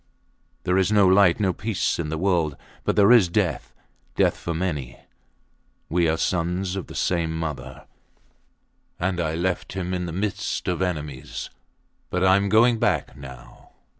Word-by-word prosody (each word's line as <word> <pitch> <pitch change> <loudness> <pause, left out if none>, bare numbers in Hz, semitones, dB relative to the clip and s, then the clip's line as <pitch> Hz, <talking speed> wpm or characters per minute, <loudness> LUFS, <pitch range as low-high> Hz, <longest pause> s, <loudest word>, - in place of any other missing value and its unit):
There 90 +1 +2
is 95 +2 +1
no 105 -2 +5
light 95 -2 +5
and 105 - -3
no 95 -2 +2
peace 105 -3 -1
in 80 -3 -2
the 80 - -3
world; 85 -5 0 0.3
but - - 0
there 105 +1 +5
is 110 -8 +6
death - - -1 0.4
death - - +3
for 85 - -5
many. 80 -7 -3 0.9
We 85 0 +2
are 80 - +1
sons 90 +2 -1
of 95 - -5
the - - -10
same 85 -2 0
mother 80 -4 -6 1.1
and 90 0 -1
I 80 -2 -1
left 90 +2 -2
him 90 -1 -3
in 90 -1 -2
the - - -4
midst 100 +4 -3
of 90 0 -1
enemies; 75 -7 -4 0.6
but 90 0 -1
I 95 0 +6
am 100 0 0
going 115 +2 +4
back 90 -10 0
now. 65 -3 -13
90 Hz, 165 wpm, -24 LUFS, 80-95 Hz, 1.1 s, is